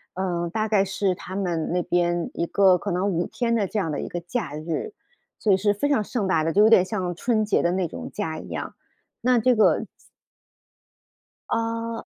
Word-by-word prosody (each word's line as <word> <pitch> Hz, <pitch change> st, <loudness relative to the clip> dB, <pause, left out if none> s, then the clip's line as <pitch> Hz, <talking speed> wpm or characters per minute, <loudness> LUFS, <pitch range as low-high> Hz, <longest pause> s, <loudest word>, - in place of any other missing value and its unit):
嗯， 175 Hz, -2 st, -2 dB
大 215 Hz, +5 st, -1 dB
概 210 Hz, -3 st, +3 dB
是 195 Hz, -1 st, 0 dB
他 185 Hz, +1 st, -8 dB
们 175 Hz, -5 st, -1 dB
那 180 Hz, 0 st, 0 dB
边 175 Hz, -1 st, 0 dB
一 170 Hz, -, -2 dB
个 190 Hz, -2 st, +4 dB
可 205 Hz, -, -4 dB
能 185 Hz, +2 st, 0 dB
5 175 Hz, -1 st, -1 dB
天 235 Hz, -2 st, -1 dB
的 215 Hz, -4 st, +1 dB
这 215 Hz, -, -4 dB
样 165 Hz, -6 st, 0 dB
的 145 Hz, -, -3 dB
一 -, -, -5 dB
个 175 Hz, -, -4 dB
假 175 Hz, -, -4 dB
日， 165 Hz, -, -4 dB, 0.4 s
所 210 Hz, -, +2 dB
以 -, -, +6 dB
是 205 Hz, +1 st, +1 dB
非 285 Hz, +8 st, 0 dB
常 275 Hz, -7 st, +2 dB
盛 215 Hz, 0 st, -2 dB
大 165 Hz, -4 st, +2 dB
的， 165 Hz, -, 0 dB
就 205 Hz, +4 st, +5 dB
有 220 Hz, -, +6 dB
点 185 Hz, -, +7 dB
像 185 Hz, -2 st, -3 dB
春 215 Hz, +4 st, 0 dB
节 210 Hz, -, +2 dB
的 170 Hz, -, +1 dB
那 185 Hz, -1 st, 0 dB
种 -, -, -7 dB
假 160 Hz, -6 st, -4 dB
一 -, -, -10 dB
样， -, -, -5 dB, 0.5 s
那 250 Hz, 0 st, +3 dB
这 250 Hz, +2 st, +3 dB
个 220 Hz, -, +3 dB, 1.6 s
呃， 230 Hz, 0 st, -2 dB
190 Hz, 220 characters per minute, -24 LUFS, 175-220 Hz, 1.6 s, 点